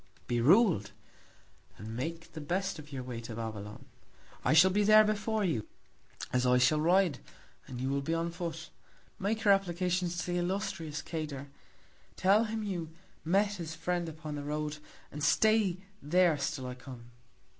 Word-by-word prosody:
Be 120 Hz, -1 st, 0 dB
rul'd, 165 Hz, -, +4 dB, 0.9 s
and 110 Hz, +3 st, -7 dB
make 165 Hz, +6 st, -5 dB
the 155 Hz, -, -6 dB
best 185 Hz, +3 st, -2 dB
of 150 Hz, 0 st, -12 dB
your 130 Hz, -2 st, -5 dB
Way 125 Hz, -2 st, -6 dB
to 115 Hz, -1 st, -7 dB
Babylon. 110 Hz, -2 st, -6 dB, 0.6 s
I -, -, +2 dB
shall 180 Hz, +4 st, +7 dB
be 205 Hz, +2 st, +2 dB
there 215 Hz, +1 st, +7 dB
before 215 Hz, 0 st, 0 dB
you, 140 Hz, -, -1 dB, 0.7 s
as 125 Hz, 0 st, +2 dB
I 125 Hz, 0 st, +4 dB
shall 150 Hz, +5 st, +3 dB
ride, 175 Hz, -2 st, +3 dB, 0.5 s
and 125 Hz, -2 st, -7 dB
you 130 Hz, -, -2 dB
will 140 Hz, 0 st, 0 dB
be 160 Hz, +4 st, -1 dB
on 165 Hz, +1 st, -1 dB
Foot. 170 Hz, -1 st, -6 dB, 0.5 s
Make 215 Hz, +3 st, -1 dB
your 200 Hz, -, +7 dB
Applications 180 Hz, -2 st, 0 dB
to 175 Hz, -, -2 dB
the 175 Hz, 0 st, -1 dB
illustrious 180 Hz, -4 st, -3 dB
Cador; 150 Hz, -4 st, -5 dB, 0.7 s
tell 200 Hz, +4 st, +4 dB
him 220 Hz, 0 st, -3 dB
you 175 Hz, -6 st, -3 dB, 0.3 s
met 200 Hz, +5 st, +2 dB
his 165 Hz, -2 st, -6 dB
Friend 175 Hz, +1 st, -2 dB
upon 155 Hz, -1 st, -7 dB
the 145 Hz, -1 st, -5 dB
Road; 150 Hz, +1 st, -3 dB, 0.3 s
and 150 Hz, 0 st, -6 dB
stay 210 Hz, +3 st, +3 dB, 0.2 s
there 175 Hz, +2 st, +3 dB
still 130 Hz, -, -2 dB
I 125 Hz, -, -4 dB
come. 125 Hz, -2 st, -11 dB
165 Hz, 165 wpm, -31 LUFS, 140-190 Hz, 0.9 s, shall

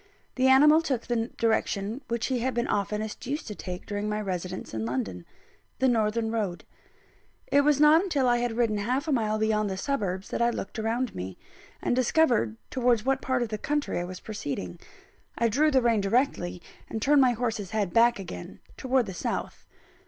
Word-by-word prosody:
The 260 Hz, 0 st, +2 dB
animal 300 Hz, +4 st, +7 dB
took 265 Hz, -7 st, -2 dB
the 235 Hz, -1 st, -1 dB
direction 220 Hz, +1 st, 0 dB
which 235 Hz, -1 st, -1 dB
he 260 Hz, -2 st, 0 dB
had 255 Hz, +1 st, -1 dB
been 235 Hz, +1 st, 0 dB
oftenest 210 Hz, +2 st, -2 dB
used 290 Hz, +4 st, -3 dB
to 210 Hz, -, -5 dB
take 180 Hz, -3 st, -7 dB
during 205 Hz, 0 st, -3 dB
my 210 Hz, 0 st, -1 dB
residence 185 Hz, -, -4 dB
in 110 Hz, 0 st, -2 dB
London 110 Hz, -8 st, -3 dB, 0.5 s
the 265 Hz, -, +2 dB
northern 225 Hz, -1 st, +1 dB
road. 205 Hz, -6 st, -2 dB, 0.9 s
It 285 Hz, -, +6 dB
was 290 Hz, 0 st, +3 dB
not 300 Hz, +2 st, +7 dB
until 295 Hz, -9 st, 0 dB
I 240 Hz, 0 st, +4 dB
had 240 Hz, -1 st, -2 dB
ridden 225 Hz, -3 st, +1 dB
half 255 Hz, +8 st, -1 dB
a -, -, 0 dB
mile 215 Hz, -5 st, +1 dB
beyond 215 Hz, -1 st, +1 dB
the 190 Hz, -, -3 dB
suburbs 195 Hz, -6 st, -2 dB
that -, -, -2 dB
I 235 Hz, -, +4 dB
looked 225 Hz, -2 st, -5 dB
round 230 Hz, +3 st, -1 dB
me, 95 Hz, 0 st, -6 dB, 0.5 s
and -, -, +1 dB
discovered 245 Hz, -, +2 dB
towards 245 Hz, -3 st, +2 dB
what 270 Hz, 0 st, +1 dB
part 255 Hz, -1 st, 0 dB
of 235 Hz, -, -4 dB
the 215 Hz, -1 st, -4 dB
country 295 Hz, -7 st, -1 dB
I -, -, -2 dB
was 180 Hz, 0 st, -7 dB
proceeding. 140 Hz, -, -5 dB, 0.6 s
I 235 Hz, -, +3 dB
drew 295 Hz, +8 st, +3 dB
the 265 Hz, -4 st, +3 dB
rein 230 Hz, -3 st, +3 dB
directly, 195 Hz, -5 st, 0 dB, 0.3 s
and 220 Hz, -, -3 dB
turned 285 Hz, +4 st, +4 dB
my 255 Hz, -2 st, +4 dB
horse's 225 Hz, -5 st, -2 dB
head 205 Hz, -4 st, -1 dB
back 235 Hz, +1 st, +5 dB
again, 155 Hz, -, -8 dB, 0.2 s
towards 260 Hz, -2 st, +1 dB
the 195 Hz, -, -6 dB
south. 170 Hz, -, -4 dB
230 Hz, 195 wpm, -27 LUFS, 200-260 Hz, 0.9 s, animal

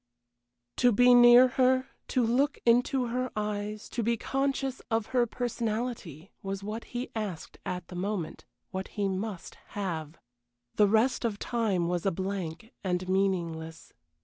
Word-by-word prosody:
To 245 Hz, -, +5 dB
be 245 Hz, +3 st, +6 dB
near 245 Hz, +1 st, +9 dB
her, 255 Hz, +1 st, +2 dB, 0.2 s
to 255 Hz, -, +1 dB
look 275 Hz, +6 st, +2 dB
into 245 Hz, +2 st, +3 dB
her 255 Hz, +2 st, -1 dB
eyes, 210 Hz, 0 st, -3 dB
to 235 Hz, -, -2 dB
be 230 Hz, +1 st, +1 dB
conscious 270 Hz, +1 st, -1 dB
of 225 Hz, -2 st, +1 dB
her 245 Hz, -2 st, +3 dB
personality 225 Hz, -, -3 dB
was 195 Hz, 0 st, -4 dB
what 215 Hz, +3 st, -5 dB
he 245 Hz, +1 st, -5 dB
asked 205 Hz, -7 st, -5 dB
at 180 Hz, -1 st, -4 dB
the 180 Hz, -, -9 dB
moment, 180 Hz, -3 st, -3 dB, 0.3 s
what 190 Hz, 0 st, -4 dB
he 200 Hz, -1 st, +1 dB
must 195 Hz, -1 st, -4 dB, 0.2 s
have. 165 Hz, -5 st, -3 dB, 0.6 s
The 210 Hz, -, +4 dB
rest 225 Hz, +6 st, +2 dB
of 225 Hz, -3 st, -1 dB
time 205 Hz, -7 st, 0 dB
was 175 Hz, +2 st, -1 dB
a -, -, +3 dB
blank, 190 Hz, +2 st, -4 dB
and 180 Hz, -1 st, -1 dB
meaningless. 170 Hz, -4 st, -1 dB
210 Hz, 150 wpm, -29 LUFS, 185-245 Hz, 0.6 s, near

